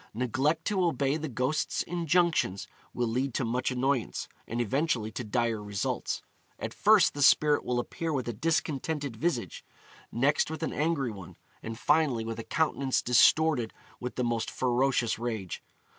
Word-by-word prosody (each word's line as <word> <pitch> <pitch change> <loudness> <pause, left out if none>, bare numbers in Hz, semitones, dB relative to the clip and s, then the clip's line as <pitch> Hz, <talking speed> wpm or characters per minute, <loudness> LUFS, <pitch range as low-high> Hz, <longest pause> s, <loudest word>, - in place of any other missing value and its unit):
Neglect 135 +7 0
to 195 -3 +1
obey 145 -5 +1
the 155 0 -3
ghost's 130 +5 -1
injunctions 170 - +1 0.2
will 120 - -1
lead 125 +3 -1
to 130 - 0
much 125 +2 0
annoyance, 130 -1 -1 0.2
and 115 - -3
eventually 120 -2 0
to 120 - -5
dire 115 0 0
results. 105 -2 -3 0.3
At - - -5
first 205 -4 +5
the 145 - -5
spirit 150 +1 +5
will 125 - -1
appear 165 +6 -3
with 130 -5 -2
a 120 - -2
discontented 145 0 -1
visage, 120 - -2 0.5
next 140 +6 +2
with 160 +1 -5
an - - -2
angry 150 -5 0
one, 95 -5 -10 0.3
and 110 0 -6
finally 145 -6 +2
with 115 0 -5
a - - -4
countenance 140 -3 0
distorted 125 +1 +4 0.2
with 125 0 -5
the 125 - -1
most 120 -1 -1
ferocious 125 -2 +1
rage. 110 -7 -4
130 Hz, 160 wpm, -29 LUFS, 115-155 Hz, 0.5 s, first